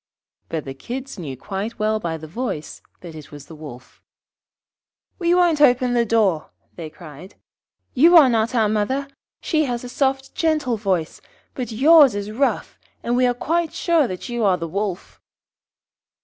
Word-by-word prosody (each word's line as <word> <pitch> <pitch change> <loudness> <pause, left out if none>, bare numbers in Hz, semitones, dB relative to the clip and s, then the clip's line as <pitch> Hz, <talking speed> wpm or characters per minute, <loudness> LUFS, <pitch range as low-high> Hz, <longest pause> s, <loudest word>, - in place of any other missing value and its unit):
But 160 -2 -4
the 135 - -6
Kids 250 - -7
knew 140 -6 -6
quite 200 - -5
well 215 0 0
by 165 -5 -3
the 160 - -10
voice 160 -3 -5 0.2
that 170 -2 -10
it 155 -2 -12
was 145 -1 -11
the 160 - -13
Wolf. 145 -5 -12 1.2
'We 345 -1 +2
won't 345 -4 +3
open 250 -3 +4
the 235 -1 +1
door,' 205 -8 +1 0.3
they 165 -3 -7
cried. 165 +2 -13 0.6
'You 335 +7 +6
are 300 -5 +8
not 230 0 0
our 220 -2 +3
mother. 220 +7 -1 0.3
She 310 -2 +1
has 245 -2 -3
a 250 - -7
soft 270 +1 -1
gentle 305 -7 0
voice; 190 -6 -2 0.3
but 245 -4 -5
yours 280 +1 +6
is 205 +1 -4
rough, 270 +5 -1 0.2
and 240 - 0
we 250 0 +3
are 245 - 0
quite 330 +5 -1
sure 330 -6 +2
that 185 -4 -7
you 240 -1 -3
are 190 -3 +3
the 165 - -5
Wolf.' 195 +1 -5
230 Hz, 170 wpm, -21 LUFS, 180-270 Hz, 1.2 s, are